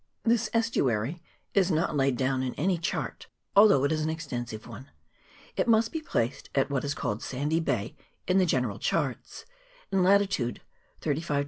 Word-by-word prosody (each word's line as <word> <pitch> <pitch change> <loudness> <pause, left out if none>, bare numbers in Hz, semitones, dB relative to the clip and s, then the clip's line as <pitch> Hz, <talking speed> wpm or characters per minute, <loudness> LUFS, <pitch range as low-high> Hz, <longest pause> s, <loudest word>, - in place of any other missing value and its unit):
This 225 -1 +2
estuary 160 - 0 0.3
is 195 -2 +3
not 160 -2 +1
laid 135 -3 +2
down 130 0 0
in 130 -1 -3
any 180 +2 +1
chart, 170 - -3 0.3
al 205 +2 +9
though 140 -10 +4
it 140 - +2
is 155 -1 0
an 155 - 0
extensive 120 -8 -5
one; 130 +3 -10 0.7
it - - 0
must 225 0 +4
be 320 - -3
placed 120 - -2
at 135 0 +2
what 135 -2 0
is 145 0 -2
called 105 +2 -2
Sandy 145 +5 -1
Bay 125 -9 -2 0.3
in 185 +1 +4
the 185 - +3
general 125 -9 0
charts, 140 -7 -2 0.5
in 195 - +2
208 200 0 +4
NORTH 120 -1 -2 0.4
CAPE. 150 0 -1
150 Hz, 180 wpm, -28 LUFS, 130-185 Hz, 0.7 s, al